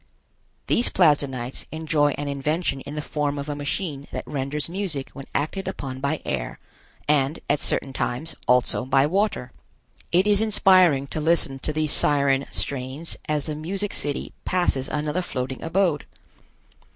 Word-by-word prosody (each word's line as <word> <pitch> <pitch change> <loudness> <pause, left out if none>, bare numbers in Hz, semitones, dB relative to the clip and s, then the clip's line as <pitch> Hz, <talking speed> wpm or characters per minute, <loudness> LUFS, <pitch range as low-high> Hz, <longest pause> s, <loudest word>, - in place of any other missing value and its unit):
These 240 - +3
Plasdenites 140 -7 +1
enjoy 155 -2 +1
an 145 - -3
invention 140 +1 -1
in 145 - -7
the 150 - -3
form 145 -1 -1
of 140 +1 -4
a 145 - -2
machine 145 0 -3
that - - -4
renders 145 +1 -1
music 170 -6 -3
when 135 -1 -9
acted 170 +7 -1
upon 135 -8 -5
by 140 +3 -1
air, - - -3 0.5
and, 145 +1 +2
at 145 0 +2
certain 135 - 0
times, 130 +6 -2
also 125 0 +3
by 135 +1 +3
water. 185 - 0 0.6
It 180 +3 +4
is 210 0 +5
inspiring 185 -9 +5
to 155 - -3
listen 150 -4 +2
to 155 - -2
these 155 -1 0
Siren 140 -2 +3
strains 135 +4 -3
as 150 -2 0
the 155 - -2
music 190 +7 -3
city 145 -1 -2
passes 175 -7 +1
another 150 +4 -1
floating 130 -6 -4
abode. 165 -3 +1
150 Hz, 150 wpm, -24 LUFS, 135-165 Hz, 0.6 s, is